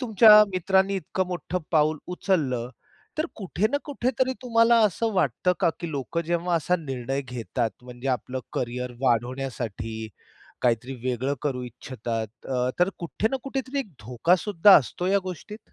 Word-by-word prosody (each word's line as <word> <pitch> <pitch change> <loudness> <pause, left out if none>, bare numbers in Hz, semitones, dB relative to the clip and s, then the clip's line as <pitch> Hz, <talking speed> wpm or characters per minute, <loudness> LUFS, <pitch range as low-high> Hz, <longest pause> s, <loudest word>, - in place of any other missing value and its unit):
तुमच्या 215 -3 +8
मित्रांनी 190 +2 +2
इतकं 185 +1 -2
मोठं 180 0 -3
पाऊल 155 -1 +3 0.2
उचललं 130 -12 0 0.5
तर 315 - +1
कुठे 195 0 -1
ना - - +3
कुठे 260 -4 -1
तरी 260 0 +2
तुम्हाला 230 -1 +4
असं 220 +4 -1
वाटतं 180 - +1
का, 170 -3 +4
की 170 -2 -4
लोकं 145 +4 -2
जेव्हा 170 +1 0
असा 180 +3 +1
निर्णय 135 -3 -3
घेतात 120 -2 -3
म्हणजे 125 +1 -7
आपलं 130 +1 -2
करिअर 125 0 -3
वाढवण्यासाठी, 120 -3 -2 0.5
काहीतरी 125 +2 +1
वेगळं 130 +3 -1
करू 130 -4 -2
इच्छितात 115 -2 -6
अ, 125 -1 0
तर 180 +2 +4
कुठे 175 +5 -1
ना 270 - 0
कुठेतरी 270 0 -3
एक 240 -8 -3
धोका 125 +11 +2
सुद्धा 205 -1 +6
असतो 165 +7 -1
या 200 +1 +4
गोष्टीत? 210 +6 -9
155 Hz, 155 wpm, -25 LUFS, 125-195 Hz, 0.5 s, तुमच्या